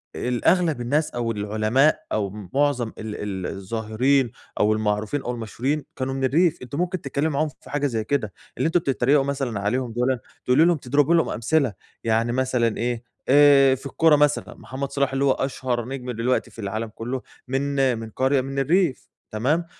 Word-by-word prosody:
الأغلب 150 +4 +1
الناس 145 +6 0
أو 120 -1 -2
العلماء 110 +7 +2
أو 105 -2 0 0.2
معظم 140 -4 +2
ال 110 -1 -6
ال 95 -3 -4
الظاهرين 110 +6 0 0.3
أو 105 +1 +4
المعروفين 110 +5 -1
أو 125 - -3
المشهورين 125 +6 -3
كانوا 135 0 -2
من 135 0 -3
الريف، 165 +5 +3
أنتِ 125 +2 -7
ممكن 180 +2 -1
تتكلمي 140 +3 -1
معاهم 150 +1 0
في - - -15
حاجة 145 0 0
زي 115 -4 -2
كده، 110 -7 -1 0.2
اللي - - +1
أنتم 170 +2 +3
بتتريقوا 135 -1 +2
مثلًا 135 -6 -2
عليهم 120 +4 -1
دُولا، 125 +2 0 0.3
تقولي 130 +6 +5
لهم 170 -2 +3
تضربي 145 +5 +2
لهم 165 - +3
أمثلة، 125 +1 +1 0.3
يعني 115 +1 +1
مثلًا 125 -3 0
إيه 120 0 -2 0.3
آآ، 140 -1 +7
في 135 - -13
الكورة 160 +3 +4
مثلًا 150 0 +1
محمد 135 +1 -6
صلاح 140 -1 0
اللي 135 +1 +1
هُو 135 - +4
أشهر 130 -3 -2
نجم 125 -1 -5
دلوقتي 120 +2 -1
في - - -15
العالم 110 +2 -3
كله 125 +3 -4 0.3
من 135 -1 +1
من 110 0 -7
قرية 130 +3 +1
من 135 +1 -4
الريف، 165 0 +1 0.2
تمام، 145 +11 0
130 Hz, 175 wpm, -23 LUFS, 115-140 Hz, 0.3 s, آآ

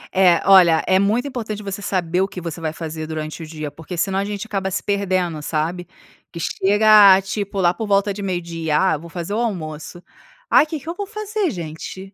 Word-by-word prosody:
É, 180 -3 +4
olha, 175 -4 +6
é 185 0 +3
muito 220 +7 +1
importante 220 -5 -5
você 200 0 -5
saber 180 -2 -1
o 190 - +1
que 190 - -8
você 165 -1 -6
vai 155 - -2
fazer 160 -1 -6
durante 155 +1 -5
o - - -6
dia, 155 -2 -6
porque 160 +4 -9
senão 195 +2 0
a 195 - 0
gente 205 0 -5
acaba 195 -3 -2
se 190 - -3
perdendo, 185 -6 -1
sabe? 165 +4 -3 0.4
Que 170 - -8
chega 205 +2 +5
tipo 200 0 -4
lá 175 -1 +3
por 220 +1 -5
volta 200 0 +2
de 205 - -7
meio-dia, 170 -5 -2
"Ah 190 - +3
eu 150 - -2
vou 170 +1 -11
fazer 175 +3 -5
o 220 - 0
almoço". 175 -6 -4 0.5
"Ai, 305 - +6
que 310 -1 -4
que 315 - -18
eu 335 - -2
vou 405 +2 -5
fazer 425 -3 -2
gente?". 180 - -7
190 Hz, 220 wpm, -20 LUFS, 165-205 Hz, 0.5 s, olha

